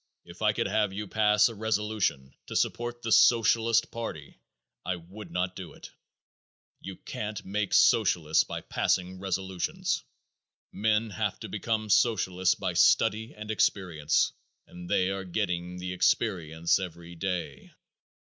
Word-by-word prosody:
If - - -13
I - - +4
could - - -2
have 105 -2 +1
you 105 +2 -5
pass 105 0 +4
a 115 - -6
resolution 105 -10 -1
to - - -7
support 120 0 -1
the 115 - -3
Socialist 115 0 +4
party 80 -11 -7 0.4
I 90 - -2
would 95 +5 -11
not 90 0 -2
do 90 -6 -8
it. - - -12 0.9
You 95 0 -8
can't 105 +2 -6
make 100 0 -2
Socialists 85 -8 +4
by - - -6
passing 90 0 -1
resolutions. 95 -1 -2 0.7
Men 110 +1 0
have 90 - -2
to - - -6
become 110 -1 -2
Socialists 95 -5 +3
by - - -3
study 110 +3 +3
and 105 0 -6
experience, 85 -8 +1 0.3
and 90 0 -11
they 95 +1 +2
are 95 0 -3
getting 90 -2 -3
the 90 0 -4
experience 85 -4 +1
every 85 -2 -7
day. 90 +1 -4
95 Hz, 135 wpm, -28 LUFS, 90-110 Hz, 0.9 s, I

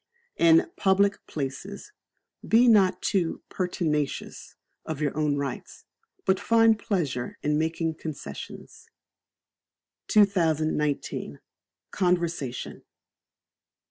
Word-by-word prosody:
In 335 0 +5
Public 200 +1 +2
Places 155 - -6 0.6
be 235 +3 +5
not 200 -5 +4
too 175 -4 0
pertinacious 160 -6 -3 0.3
of 155 -3 -5
your 150 -2 -1
own 150 -2 +1
rights, 140 -2 -6 0.4
but 190 0 +2
find 225 +1 +4
pleasure 145 - -2
in 150 0 +1
making 160 0 -1
concessions. 155 -3 -8 1.2
2019. 160 - +1 0.5
Conversation. 170 -8 -1
170 Hz, 80 wpm, -26 LUFS, 150-200 Hz, 1.2 s, In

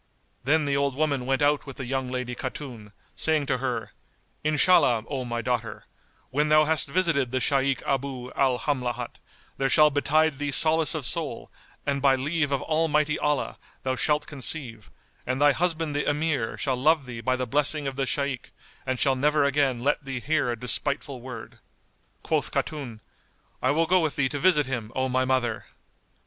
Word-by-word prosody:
Then 150 +3 +2
the 140 -1 0
old 140 -1 0
woman 140 -4 0
went 135 +1 +1
out 145 0 +2
with 135 - -8
the 135 - -5
young 130 +1 -2
lady 125 -1 -3
Khatun, 125 -4 -7 0.2
saying 155 -2 +1
to 130 -1 -1
her, 125 -1 -3 0.5
"Inshallah, 150 -6 +4
O 135 -3 -3
my 120 -1 -3
daughter, 115 -3 -3 0.5
when 150 +3 +1
thou 155 0 +5
hast 155 -2 +1
visited 155 -6 +1
the 130 +1 -1
Shaykh 135 +1 +1
Abu 135 -2 -3
al 130 -2 +1
Hamlat, 125 -4 -3 0.4
there 135 0 0
shall 150 0 +6
betide 150 +1 +2
thee 145 0 -1
solace 160 +2 +4
of 150 -5 -3
soul 155 +1 -2 0.3
and 140 -1 -1
by 135 -1 +5
leave 145 +2 -1
of 140 - 0
Almighty 150 -1 +1
Allah 150 -1 -1 0.2
thou 130 0 -1
shalt 150 +2 +1
conceive, 130 -6 -5 0.4
and 130 +1 -1
thy 145 0 +6
husband 165 -1 -1
the 145 - 0
Emir 145 -6 -1
shall 130 -3 -1
love 150 +2 +3
thee 120 -2 -7
by 130 +2 +1
the 130 0 -2
blessing 145 +4 +1
of 135 -1 -3
the 135 0 -1
Shaykh 135 +1 -2 0.4
and 130 -1 -1
shall 135 -2 +3
never 150 +3 +2
again 140 -4 +1
let 145 +1 +1
thee 135 -2 -4
hear 145 0 0
a 120 - -2
despiteful 140 +2 +1
word." 125 -2 -9 0.6
Quoth - - 0
Khatun, 130 -8 -4 0.6
"I - - +1
will 165 +3 +2
go 185 +3 +4
with 155 -4 -1
thee 135 -2 +1
to 145 - -4
visit 165 -3 +4
him, 120 -4 -4
O 130 0 0
my 130 0 +1
mother!" 120 -4 0
140 Hz, 185 wpm, -26 LUFS, 130-150 Hz, 0.6 s, shall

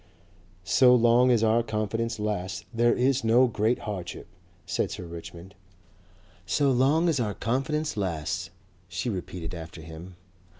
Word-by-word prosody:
"So 125 +6 +6
long 120 +1 +5
as 120 -3 +3
our 115 +1 +4
confidence 115 +1 -2
lasts 100 -3 -3
there 120 +1 +3
is 130 0 +1
no 115 +3 +5
great 115 0 +1
hardship," 100 -6 -6 0.4
said - - -1
Sir - - -6
Richmond. 85 +2 -10 0.9
"So 140 +7 +2
long 140 +7 +3
as 160 -5 +1
our 105 -4 -1
confidence 150 +6 -1
lasts," 85 -7 -2 0.4
she 90 +7 -3
repeated 90 -3 -6
after 80 -1 -8
him. 80 +3 -10
110 Hz, 135 wpm, -27 LUFS, 90-125 Hz, 0.9 s, So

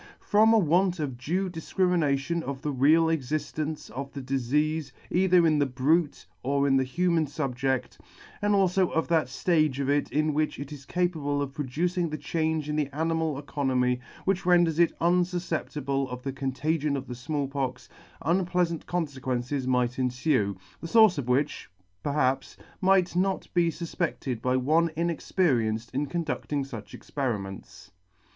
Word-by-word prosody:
From 215 +2 +4
a 225 - +6
want 180 0 +2
of 140 -5 -2
due 175 +10 -1
difcrimination 170 -3 0
of 140 -2 -6
the 150 - -1
real 150 +5 +4
existence 155 0 -2
of 135 +4 -6
the 140 - -5
difeafe 140 +3 0 0.2
either 180 -1 +4
in 155 -2 +3
the 145 - +2
brute 145 +5 +1 0.2
or 140 +2 +1
in 135 - +3
the 130 - +3
human 165 +4 +1
fubjedt, 135 -2 -2 0.4
and 205 0 +2
alfo 190 -1 +2
of 160 - +1
that 160 -6 +2
ftage 155 0 +1
of 140 0 0
it 145 0 0
in 155 +1 +1
which 155 +1 0
it 140 +1 -7
is 140 -3 -10
capable 160 -5 0
of 140 -1 -3
pro 145 0 -3
ducing 170 +6 -1
the 155 - -4
change 155 +1 -1
in 150 - -2
the 150 -2 0
animal 160 0 -1
economy, 130 -3 0 0.3
which 190 -1 +1
renders 175 -3 +3
it 170 - +5
un 175 +2 +3
fufceptible 150 -6 -2
of 125 0 -7
the 135 - -3
contagion 140 +2 -1
of 135 - -5
the 125 - -6
Small 140 +3 -3
Pox, 130 -2 -3 0.4
unpleafant 175 0 0
con 175 -1 0
ferences, 130 -1 -3
might 125 -1 +1
enfue, 125 - +1 0.2
the 165 - -6
fource 215 -4 +5
of 130 - -4
which, 130 -2 0 0.3
perhaps, 135 -2 0 0.2
might 185 -2 +3
not 190 +1 0
be 175 -1 +3
fufpedted 160 -7 -3
by 125 +1 +1
one 155 +6 +2
inexperienced 135 - 0
in 140 +3 -1
conducting 150 -3 -2
fuch 115 -6 -8
experiments. 100 - -5
150 Hz, 160 wpm, -27 LUFS, 135-170 Hz, 0.4 s, a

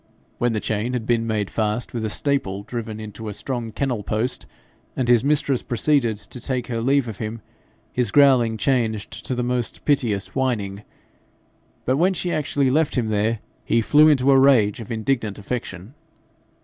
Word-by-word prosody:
When 120 -1 +1
the 110 - 0
chain 110 +4 -2
had 120 -3 -2
been 115 -1 +1
made 105 -3 -1
fast 110 +2 -1
with 115 -2 -3
a 110 - -1
staple 105 -6 -1
driven 110 -1 -5
into 110 +1 -8
a 105 - -6
strong 120 -3 -4
kennel 125 -1 -2
post, 110 +5 -2 0.5
and 130 - -1
his 120 -1 +5
mistress 140 -2 +1
proceeded 120 -2 +1
to 105 +4 -9
take 125 -1 -2
her 115 -2 -3
leave 135 +1 +2
of 110 -3 -7
him, 110 +1 -5 0.5
his 125 -3 +1
growling 125 -4 +4
changed 110 -3 0 0.2
to 130 - -1
the 125 - -1
most 125 -1 -2
piteous 115 -9 0
whining; 105 -7 -1 1.0
but 130 +2 +2
when 185 +4 +2
she 175 0 -2
actually 140 -3 +1
left 155 +2 +1
him 115 -3 0
there, 110 +1 0 0.2
he 115 - +2
flew 150 +7 +5
into 140 -2 +4
a 135 - +6
rage 120 -7 +4
of 115 - -8
indignant 110 -2 -1
affection. 105 -1 -6
120 Hz, 175 wpm, -22 LUFS, 110-130 Hz, 1.0 s, a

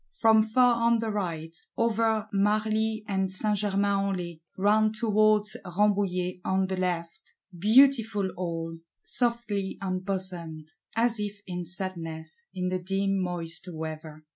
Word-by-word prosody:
From 220 -1 +6
far 235 +2 +3
on 235 0 +4
the 225 -1 -2
right, 165 -5 -3 0.2
over 225 -1 +1
Marly 215 +2 +1
and 190 -2 0
Saint 210 +2 0
Germains 200 -1 +1
en 195 - -1
Laye; 170 -2 -6 0.2
round 215 +2 +3
towards 215 -2 +3
Rambouillet, 185 -1 0
on 190 0 +1
the 190 0 -2
left: 180 0 -3 0.2
beautiful 220 -1 +4
all; 165 -2 -4 0.2
softly 235 -5 -1
embosomed; 185 -4 -4 0.3
as 230 0 +2
if 205 0 -4
in 180 -1 -5
sadness, 170 - -5
in 185 -1 -2
the 185 0 -1
dim 195 +1 0
moist 175 0 -4
weather! 155 -1 -7
195 Hz, 130 wpm, -28 LUFS, 180-215 Hz, 0.3 s, From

